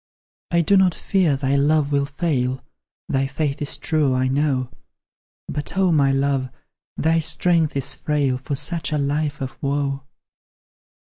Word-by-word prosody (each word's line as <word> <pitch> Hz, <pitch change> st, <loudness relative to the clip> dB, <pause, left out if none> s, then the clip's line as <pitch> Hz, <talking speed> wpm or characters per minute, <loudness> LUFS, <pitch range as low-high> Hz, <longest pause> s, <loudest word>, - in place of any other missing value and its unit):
I 170 Hz, -1 st, +3 dB
do 195 Hz, +5 st, +3 dB
not 185 Hz, -2 st, +3 dB
fear 180 Hz, -7 st, +1 dB
thy 135 Hz, 0 st, 0 dB
love 145 Hz, +1 st, +2 dB
will 140 Hz, -1 st, +1 dB
fail; 135 Hz, -4 st, -1 dB, 0.4 s
Thy 135 Hz, 0 st, 0 dB
faith 145 Hz, 0 st, -2 dB
is 145 Hz, -, -3 dB
true, 150 Hz, -5 st, +1 dB
I 130 Hz, 0 st, +1 dB
know; 135 Hz, -2 st, 0 dB, 0.8 s
But, 150 Hz, +5 st, -3 dB
oh, 190 Hz, -2 st, +3 dB
my 140 Hz, -4 st, +3 dB
love! 135 Hz, -1 st, 0 dB, 0.5 s
thy 165 Hz, +1 st, +2 dB
strength 165 Hz, -1 st, +2 dB
is 135 Hz, -, 0 dB
frail 140 Hz, -4 st, -1 dB
For 140 Hz, +2 st, -4 dB
such 155 Hz, +1 st, -2 dB
a 150 Hz, -, +1 dB
life 145 Hz, +1 st, -1 dB
of 130 Hz, 0 st, -5 dB
woe. 140 Hz, -1 st, -1 dB
145 Hz, 150 wpm, -22 LUFS, 135-155 Hz, 0.8 s, I